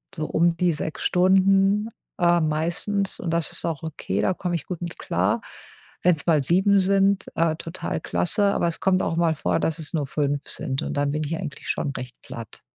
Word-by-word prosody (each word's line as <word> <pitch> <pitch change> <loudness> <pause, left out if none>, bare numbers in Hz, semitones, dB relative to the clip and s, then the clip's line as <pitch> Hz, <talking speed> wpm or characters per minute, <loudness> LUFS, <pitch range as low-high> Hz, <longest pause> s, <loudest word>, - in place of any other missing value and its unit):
so 155 -3 -2
um 170 +1 +2
die 180 0 +3
6 155 +1 -4
Stunden, 195 +3 +3 0.3
äh, 175 0 +4
meistens 170 +6 -1
und 170 - -3
das 165 -1 0
ist - - -3
auch 165 -4 -3
okay, 140 -11 -3
da 185 - +2
komme 180 -1 -2
ich 165 - -4
gut 180 -2 -5
mit 170 -1 -5
klar. - - 0 0.6
Wenn's 170 -4 +3
mal 155 -5 +4
7 190 +5 +4
sind, 195 +1 +2
äh, 165 -1 +2
total 165 +2 -4
klasse, 205 +4 +1
aber - - +1
es 170 - -3
kommt 190 -1 +3
auch 165 - -1
mal 165 -2 +2
vor, - - 0
dass 160 0 -1
es 155 0 -6
nur 150 -4 -1
5 145 0 -1
sind 130 0 -3
und - - -3
dann 145 0 +1
bin 150 +1 -1
ich 160 +3 -2
eigentlich 160 -6 -7
schon - - -1
recht 125 -2 -8
platt. 115 -3 -9
170 Hz, 205 wpm, -24 LUFS, 155-185 Hz, 0.6 s, äh